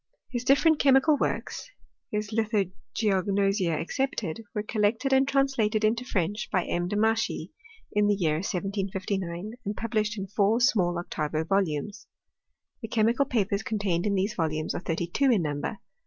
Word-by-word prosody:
His 240 -1 -2
different 295 +4 +4
chemical 275 +2 +5
works 395 - -3 0.4
(his 210 -1 -3
Lithogeognosia 200 -2 0
ex - - -5
cepted) 230 -11 -1 0.2
were 210 - -1
collected 220 +5 +1
and 265 0 +4
translated 265 -6 +1
into 230 +3 +2
French 205 0 -2
by 185 - +1
M. 175 0 -1
Demachy, 220 +2 0 0.4
in 210 0 +2
the 205 - +3
year 160 -6 +1
1759, 190 0 -3
and 205 -1 -4
published 215 -1 -1
in 195 - -3
four 205 +3 +2
small 195 -9 +2
octavo 155 -2 -2
volumes. 190 0 -1 0.7
The 225 - -5
chemical 230 +5 +2
papers 200 -5 0
contained 200 -4 -1
in 200 - +1
these 195 +3 0
volumes 155 -2 -1
are - - -4
thirty 170 -1 -2
two 270 +11 +1
in 215 -8 +3
number. 145 +7 -3
205 Hz, 150 wpm, -27 LUFS, 185-225 Hz, 0.7 s, chemical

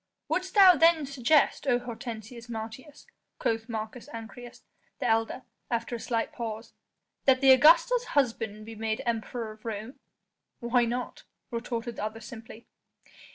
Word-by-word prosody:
"Wouldst 370 +2 -2
thou 385 -3 +9
then 325 -1 +4
suggest, 275 +2 +2
O 245 -2 +4
Hortensius 235 -1 -8
Martius," 230 +6 -8 0.3
quoth 225 +1 -1
Marcus 220 +1 -6
Ancyrus, 235 +2 -10 0.3
the 270 - -4
elder, 225 +3 0 0.3
after 235 0 -2
a - - -5
slight 230 -1 -2
pause, 225 -1 -6 0.5
"that 260 -1 +5
the 270 0 +7
Augusta's 340 - +6
husband 225 -5 0
be 225 - -8
made 220 0 -3
Emperor 230 0 -3
of 215 0 -15
Rome?" 225 +4 -6 0.6
"Why 240 0 +2
not?" 245 +2 -4 0.3
retorted 235 0 -4
the - - -4
other 215 +1 -4
simply. 225 -1 -11
235 Hz, 140 wpm, -28 LUFS, 225-260 Hz, 0.6 s, thou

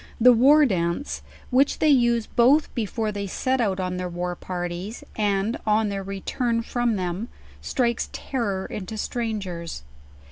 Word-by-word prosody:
The 250 +2 +8
War 285 +6 +6
Dance, 175 +3 -1 0.3
which 270 +3 +3
they 310 - +3
use 240 -4 +4
both 270 +6 +3
brfore 220 -1 -2
they 200 -1 -3
set 260 +6 0
out 195 -4 0
en 180 -1 -2
ther 180 0 -3
war 175 0 -3
parties, 175 +4 -5
and 205 +1 0
on 215 0 +2
their 200 -1 -3
return 230 +5 -2
from 240 -1 0
them, 185 +3 -3 0.3
strikes 235 -2 0
terror 205 -8 -2
into 210 +2 -6
strangers. 195 - -4
215 Hz, 145 wpm, -24 LUFS, 185-240 Hz, 0.3 s, The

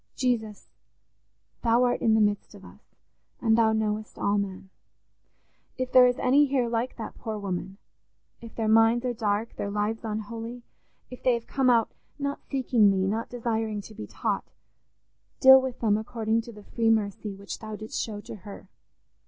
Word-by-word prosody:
Jesus, 225 -5 -2 0.9
Thou 235 +1 +3
art 245 - +1
in 220 -1 +3
the 220 - +4
midst 205 -1 0
of - - -14
us, - - -18 0.4
and 225 -2 +3
Thou 225 -1 +4
knowest 215 0 -2
all 205 0 +1
men: 190 -1 -5 1.1
if 255 -1 -3
there 255 -1 +8
is 245 - 0
any 285 +3 +4
here 260 -3 +1
like 235 +2 -2
that 225 - -8
poor 220 -2 -4
woman—if 195 +3 -9
their 225 -1 -1
minds 225 +2 +4
are 245 - 0
dark, 215 0 -2
their 200 - -3
lives 210 +2 -2
unholy—if 230 +3 -8
they 250 -2 +3
have 235 - -6
come 265 -2 +1
out 230 -2 +3 0.3
not 280 -1 -3
seeking 250 -6 +3
Thee, 190 -1 +1
not 220 +4 -2
desiring 225 -3 -2
to 215 - -12
be - - -8
taught; - - -3 0.9
deal 265 0 +9
with 260 -2 -5
them 215 -2 +2
according 220 0 -1
to 235 +1 -11
the 210 -2 -13
free 230 +1 0
mercy 210 -2 0
which 200 0 -8
Thou 215 -1 -7
didst 215 +1 -4
show 210 -2 -5
to 215 - -9
her. 200 -1 -11
225 Hz, 170 wpm, -27 LUFS, 210-240 Hz, 1.1 s, deal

